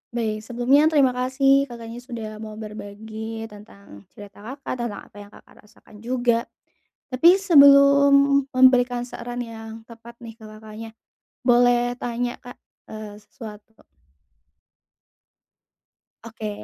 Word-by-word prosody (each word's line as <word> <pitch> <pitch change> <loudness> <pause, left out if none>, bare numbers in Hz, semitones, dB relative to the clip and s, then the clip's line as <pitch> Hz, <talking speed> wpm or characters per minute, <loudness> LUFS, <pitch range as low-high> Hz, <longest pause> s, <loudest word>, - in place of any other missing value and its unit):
Baik. 215 -2 -2
Sebelumnya 250 +6 +2
terima 285 -5 +3
kasih, 270 +2 +1
Kakaknya, 235 0 -9
sudah 235 -3 -8
mau 215 -1 -9
berbagi 220 +1 -8
tentang 200 - -15
cerita 205 -1 -13 0.2
Kakak. 270 -3 -7
Tentang 235 -4 -5
apa 205 - -19
yang 205 - -11
Kakak - - -19
rasakan 210 -1 -19
juga. 240 0 -1 0.6
Tapi 335 +8 +5
sebelum 280 -4 +5
memberikan 250 -1 +3
saran 245 0 -6
yang 225 -1 -10
tepat 235 0 -14
nih 225 -1 -10
ke, - - -15
Kakaknya. 215 +1 -11 0.5
Boleh 245 0 +3
tanya, 245 0 -4
Kak, 245 - -12 0.3
eee, 215 -1 -9
sesuatu 215 -2 -12
Kak? - - -25 2.4
Oke. 220 -2 -7
235 Hz, 120 wpm, -22 LUFS, 220-255 Hz, 2.4 s, Tapi